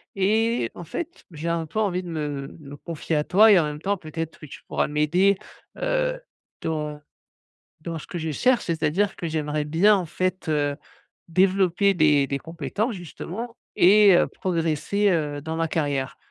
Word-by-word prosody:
et 215 Hz, -, +1 dB
en 175 Hz, -, -8 dB
fait, 345 Hz, -, -6 dB
j'ai 160 Hz, +1 st, -6 dB
un 170 Hz, -1 st, 0 dB
peu 190 Hz, +8 st, -4 dB
envie 185 Hz, -4 st, 0 dB
de 175 Hz, -, -8 dB
me 145 Hz, -4 st, -4 dB
me 145 Hz, -2 st, -10 dB
confier 165 Hz, 0 st, -4 dB
à 150 Hz, -, +2 dB
toi 210 Hz, +7 st, +6 dB
et 200 Hz, -, +7 dB
en -, -, +2 dB
même 150 Hz, 0 st, -5 dB
temps 200 Hz, +1 st, 0 dB
peut-être 160 Hz, 0 st, -6 dB
que -, -, -10 dB
tu 140 Hz, -, -11 dB
pourras -, -, 0 dB
m'aider, 175 Hz, +7 st, +2 dB, 0.4 s
heu, -, -, 0 dB, 0.4 s
dans, 150 Hz, -2 st, -2 dB
heu, 150 Hz, -, -15 dB, 0.8 s
dans 165 Hz, 0 st, -5 dB
ce -, -, -10 dB
que 175 Hz, -, -5 dB
je 160 Hz, -, -3 dB
cherche. 250 Hz, -, +2 dB
C'est-à-dire 170 Hz, +4 st, 0 dB
que 170 Hz, -, -4 dB
j'aimerais 150 Hz, -1 st, -1 dB
bien 180 Hz, +8 st, +4 dB
en 185 Hz, -3 st, -1 dB
fait, 185 Hz, +2 st, -2 dB
heu, 145 Hz, -2 st, +1 dB, 0.5 s
développer 190 Hz, +2 st, +3 dB
des 150 Hz, -4 st, +4 dB
des 140 Hz, -, -1 dB
compétences, 165 Hz, -, -3 dB
justement, 195 Hz, +6 st, -7 dB, 0.2 s
et 200 Hz, 0 st, +7 dB
heu, -, -, +4 dB
progresser, 175 Hz, +3 st, 0 dB
heu, 150 Hz, -5 st, -1 dB
dans 160 Hz, +2 st, -4 dB
ma 165 Hz, 0 st, 0 dB
carrière. 140 Hz, -5 st, -2 dB
165 Hz, 180 wpm, -24 LUFS, 150-195 Hz, 0.8 s, et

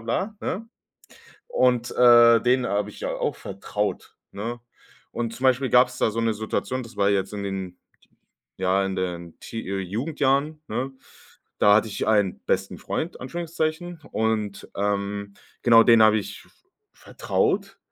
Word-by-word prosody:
bla, 190 Hz, -, -2 dB, 0.2 s
ne? 225 Hz, +4 st, -9 dB, 0.8 s
Und, 125 Hz, -, +1 dB
äh, 120 Hz, -1 st, +7 dB
den 125 Hz, 0 st, +2 dB
habe 105 Hz, +1 st, -1 dB
ich -, -, -13 dB
ja -, -, -2 dB
auch -, -, -2 dB
vertraut, 100 Hz, +2 st, -4 dB, 0.2 s
ne? 115 Hz, +4 st, -5 dB, 0.5 s
Und 115 Hz, -1 st, -3 dB
zum 130 Hz, -, -3 dB
Beispiel 130 Hz, 0 st, +3 dB
gab 125 Hz, 0 st, +6 dB
es 125 Hz, -, -11 dB
da -, -, +2 dB
so 115 Hz, -, -3 dB
'ne 115 Hz, -1 st, +1 dB
Situation, 110 Hz, +4 st, -3 dB
das 115 Hz, -2 st, -13 dB
war 100 Hz, 0 st, +3 dB
jetzt 95 Hz, 0 st, 0 dB
in 100 Hz, -1 st, -4 dB
den, 95 Hz, -2 st, -5 dB, 0.8 s
ja, 95 Hz, +1 st, +1 dB
in 95 Hz, 0 st, -3 dB
den 85 Hz, -2 st, -5 dB
Tee 115 Hz, -, -7 dB
äh, 100 Hz, 0 st, -2 dB
Jugendjahren, 140 Hz, -, -1 dB
ne? 125 Hz, +5 st, -3 dB, 0.7 s
Da 105 Hz, 0 st, +6 dB
hatte 110 Hz, +1 st, +3 dB
ich 100 Hz, -, -3 dB
einen 105 Hz, -4 st, +2 dB
besten -, -, -1 dB
Freund, 170 Hz, +3 st, -4 dB
Anführungszeichen. 165 Hz, +3 st, -3 dB
Und, 110 Hz, -2 st, -1 dB
ähm, 100 Hz, 0 st, -2 dB, 0.3 s
genau, 115 Hz, -1 st, +7 dB
den 115 Hz, -1 st, +6 dB
habe 110 Hz, 0 st, +5 dB
ich 100 Hz, -, -9 dB, 0.5 s
vertraut, -, -, -2 dB
115 Hz, 155 wpm, -24 LUFS, 100-130 Hz, 0.8 s, äh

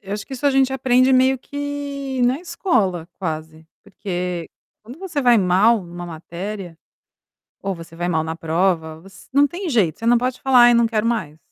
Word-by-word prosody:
eu 195 Hz, 0 st, -8 dB
acho 205 Hz, -1 st, -5 dB
que -, -, -11 dB
isso 265 Hz, +2 st, -2 dB
a -, -, +5 dB
gente 265 Hz, -1 st, +2 dB
aprende 260 Hz, 0 st, +3 dB
meio 260 Hz, 0 st, +4 dB
que 285 Hz, -2 st, -5 dB
na 255 Hz, +6 st, +1 dB
escola, 195 Hz, -, -1 dB
quase. 160 Hz, -2 st, -5 dB, 0.2 s
Porque 180 Hz, -4 st, -4 dB, 0.4 s
quando 245 Hz, +7 st, -12 dB
você 350 Hz, -6 st, -3 dB
vai 245 Hz, -2 st, +5 dB
mal 200 Hz, +5 st, +4 dB
em 175 Hz, -3 st, -11 dB
uma 175 Hz, 0 st, -7 dB
matéria, 175 Hz, +2 st, -7 dB, 0.8 s
ou 195 Hz, -1 st, -2 dB
você 165 Hz, 0 st, -12 dB
vai 175 Hz, +1 st, -2 dB
mal 160 Hz, -2 st, +1 dB
na 160 Hz, +1 st, -4 dB
prova, 165 Hz, -1 st, -1 dB
você 195 Hz, +2 st, -16 dB
não 285 Hz, +2 st, +5 dB
tem 350 Hz, +5 st, -5 dB
jeito, 205 Hz, -, +1 dB
você 230 Hz, -, -5 dB
não 240 Hz, 0 st, +5 dB
pode 255 Hz, +1 st, -2 dB
falar: 255 Hz, -2 st, +6 dB
"Ai 240 Hz, -, +7 dB
eu 235 Hz, -, +4 dB
não 235 Hz, -, +4 dB
quero 225 Hz, -1 st, -1 dB
mais." 185 Hz, -10 st, -2 dB
215 Hz, 205 wpm, -21 LUFS, 175-260 Hz, 0.8 s, Ai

